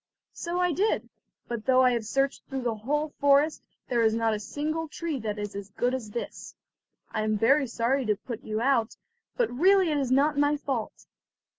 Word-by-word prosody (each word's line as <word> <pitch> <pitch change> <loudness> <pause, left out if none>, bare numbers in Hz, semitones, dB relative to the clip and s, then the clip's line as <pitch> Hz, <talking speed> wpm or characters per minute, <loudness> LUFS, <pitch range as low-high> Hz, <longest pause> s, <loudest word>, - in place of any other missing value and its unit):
"So 345 +1 -3
I 360 -1 +2
did; 405 +7 0 0.4
but 235 -1 -5
though 260 0 +5
I 250 - +5
have 235 -2 -1
searched 275 +3 0
through 265 -2 -4
the 235 -2 0
whole 295 +8 -1
forest, 285 +2 +4 0.3
there 240 -2 +1
is 220 -1 +3
not 225 -1 +1
a 210 - -2
single 310 +8 -3
tree 315 -2 -4
that 210 -2 -3
is 205 0 -4
as 200 0 -6
good 245 +5 -1
as 245 -5 -4
this. 235 - -6 0.6
I 215 - -1
am 215 0 0
very 275 +6 +3
sorry 240 +2 0
to 210 - +3
put 235 +3 -8
you 215 +1 -3
out, 245 -3 +1 0.4
but 485 -3 +1
really 370 +5 +4
it 295 - +1
is 270 -3 -1
not 285 +2 +3
my 290 +1 +3
fault. 265 -6 -4
260 Hz, 200 wpm, -27 LUFS, 225-295 Hz, 0.6 s, though